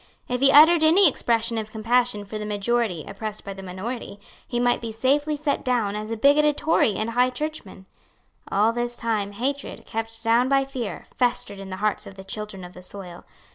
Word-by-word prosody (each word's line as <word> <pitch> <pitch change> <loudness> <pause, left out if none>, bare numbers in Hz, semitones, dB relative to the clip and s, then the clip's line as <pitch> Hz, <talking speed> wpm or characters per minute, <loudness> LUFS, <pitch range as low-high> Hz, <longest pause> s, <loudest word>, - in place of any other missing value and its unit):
If 250 0 -2
he 275 0 +6
uttered 315 +3 +8
any 345 +5 +7
expression 230 -4 0
of 215 -1 -5
compassion 230 -1 0
for 215 +2 -6
the 210 - -4
majority 210 -4 -1
oppressed 210 +1 -6
by 200 - -6
the 195 - -9
minority, 200 +3 -6 0.3
he 240 - -2
might 245 0 +2
be 230 -1 -4
safely 285 +6 +1
set 290 -1 -1
down 230 -5 0
as 215 +1 -5
a 230 - -3
bigoted 290 +4 +4
Tory 305 -10 +2
and 215 +3 -2
High 250 +2 +3
Churchman. 255 -8 -6 0.7
All 215 +3 +3
this 240 0 -2
time 215 -3 -1
hatred, 270 +6 -4
kept 225 0 -5
down 235 +3 +3
by 275 0 +3
fear, 255 -5 -5
festered 235 -5 0
in 195 -1 -8
the 185 - -5
hearts 210 - -1
of 195 - -11
the 190 - -10
children 195 -1 -6
of 180 0 -10
the 180 - -12
soil. 180 -2 -10
230 Hz, 200 wpm, -24 LUFS, 205-255 Hz, 0.7 s, uttered